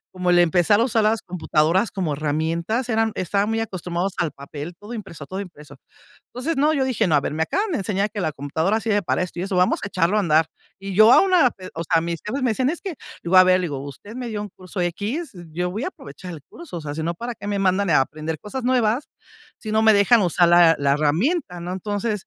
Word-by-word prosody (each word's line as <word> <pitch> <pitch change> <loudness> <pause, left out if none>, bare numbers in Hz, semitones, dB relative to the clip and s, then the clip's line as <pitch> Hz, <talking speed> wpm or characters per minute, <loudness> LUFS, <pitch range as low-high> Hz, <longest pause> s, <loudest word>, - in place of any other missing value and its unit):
Como 180 -1 -1
el 175 - +5
empezar 175 +4 +4
a - - +4
usar 235 -2 +1
las 220 +1 +1
computadoras 175 +3 +1
como 180 -7 -2
herramientas 165 - -1
eran 225 -1 +1
estaban 200 +3 0
muy 225 0 0
acostumbrados 185 -3 -3
al 165 -3 0
papel 145 +4 -8
todo 210 +3 -9
impreso, 190 -10 -8
todo 190 +7 -6
impreso 160 -6 -12 0.5
entonces 275 +7 -3
no 295 +3 +3
yo 280 - +1
dije: 245 -5 0
"No 165 - +1
a 145 - +5
ver 145 - -4
me 160 - 0
acaban 400 - -1
de - - 0
enseñar 200 +1 -1
que 205 - -5
la 155 - -1
computadora 160 +10 -1
sirve 210 -2 0
para 185 - 0
esto 180 -1 -6
y - - -2
eso 195 +1 -3
vamos 180 0 +2
a - - -4
echarlo 185 +1 +1
a - - +3
andar". 160 -3 +3 0.3
Y 195 0 -6
yo 215 +4 +7
aún, 380 +5 +5
ah, 315 -9 +5
eh, 185 -1 -9
o 165 - -3
sea, 165 0 +2
mis 170 0 -3
jefes 260 +6 -3
me 250 -3 +2
decían: 260 +4 0
"Es 340 - -5
que" 380 -4 -5 0.3
le - - -6
voy 185 - +7
a 185 - +9
ver 185 0 +5
y - - -1
le - - -1
digo: 140 -4 -5
"Usted 145 +10 -10
me 250 -1 -5
dio 215 -2 -4
un 210 - -6
curso 185 0 -7
x, 205 - -3
eh, 175 -1 -10
yo 180 +2 -2
voy 215 +8 -4
a - - -1
aprovechar 265 - -11
el 160 - -9
curso, 320 - -9
o - - -7
sea, 145 -2 -6
sino 160 +2 -2
para 235 +7 -5
qué 205 - -10
me 205 -1 -1
mandan, 195 0 +1
eh, - - +4
a - - +6
aprender 155 +3 -5
cosas 245 +4 -6
nuevas, 245 0 +1 0.5
si 215 - -6
no 220 0 +3
me 220 0 +6
dejan 205 +2 +5
usar 175 -1 +3
la 170 -1 +6
la 140 -1 +2
herramienta", 180 - 0
¿no? 175 +1 -5
Entonces, 205 +2 -3
190 Hz, 265 wpm, -22 LUFS, 170-225 Hz, 0.5 s, a